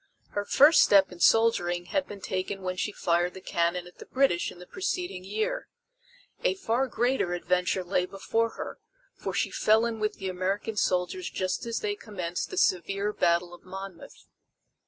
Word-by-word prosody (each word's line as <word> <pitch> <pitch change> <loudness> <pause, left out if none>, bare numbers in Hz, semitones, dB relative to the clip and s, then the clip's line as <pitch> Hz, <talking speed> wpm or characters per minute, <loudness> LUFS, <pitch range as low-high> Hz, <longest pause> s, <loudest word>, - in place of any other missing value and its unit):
Her 205 0 -3
first 290 +9 +6
step 195 -2 +5
in 180 - -11
soldiering 175 -5 +3
had 285 +10 -1
been 200 -1 -9
taken 185 +1 -3
when 185 0 -2
she 210 - -2
fired 175 -2 0
the - - -7
cannon 170 0 0
at 180 - -16
the - - -11
British 260 -10 +2
in - - -13
the 180 - -11
preceding 355 - -3
year. 450 - -2 0.8
A - - +2
far 265 -7 0
greater 240 -7 0
adventure 180 +1 0
lay 180 0 0
before 225 +4 0
her, - - -6 0.3
for - - -5
she - - 0
fell 220 +2 +3
in 230 -1 -3
with 215 0 -1
the 195 - -5
American 190 +4 -2
soldiers 185 - 0
just 185 +4 -2
as 230 - -2
they 415 -1 -1
commenced 180 - -4
the 375 - -7
severe 195 - +1
battle 175 -1 +1
of 175 - -13
Monmouth. 190 -1 -9
195 Hz, 175 wpm, -28 LUFS, 180-230 Hz, 0.8 s, first